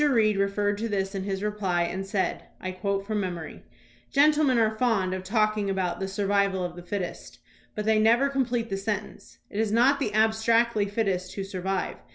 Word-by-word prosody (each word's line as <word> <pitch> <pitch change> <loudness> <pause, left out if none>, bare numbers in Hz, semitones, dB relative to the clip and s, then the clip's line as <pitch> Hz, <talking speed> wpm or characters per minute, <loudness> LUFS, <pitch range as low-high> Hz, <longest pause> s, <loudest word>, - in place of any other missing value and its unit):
Reed 220 -5 +3
referred 200 +1 0
to 230 +1 -2
this 195 -1 -1
in 195 -1 -3
his 195 0 -3
reply 200 -5 0
and 185 +3 -3
said 195 0 -2
(I 185 - -4
quote 195 +1 -2
from 215 0 -1
memory): 175 -4 -5 0.5
Gentlemen 295 -2 +4
are 220 -1 +2
fond 220 -6 +1
of 185 0 -4
talking 215 0 +1
about 190 -2 -1
"the 190 - -2
survival 200 -1 +1
of 175 -1 -4
the 175 - -8
fittest," 180 0 -5 0.4
but 210 - -3
they 220 0 +3
never 235 +5 +4
complete 250 -5 -1
the 195 - 0
sentence. 205 +1 -5
It 205 - -4
is 220 -2 +1
not 255 +5 +4
the 215 -7 -2
abstractly 220 0 +3
fittest 195 -3 -2
who 195 - -3
survive. 190 -1 -3
205 Hz, 190 wpm, -26 LUFS, 190-220 Hz, 0.5 s, Gentlemen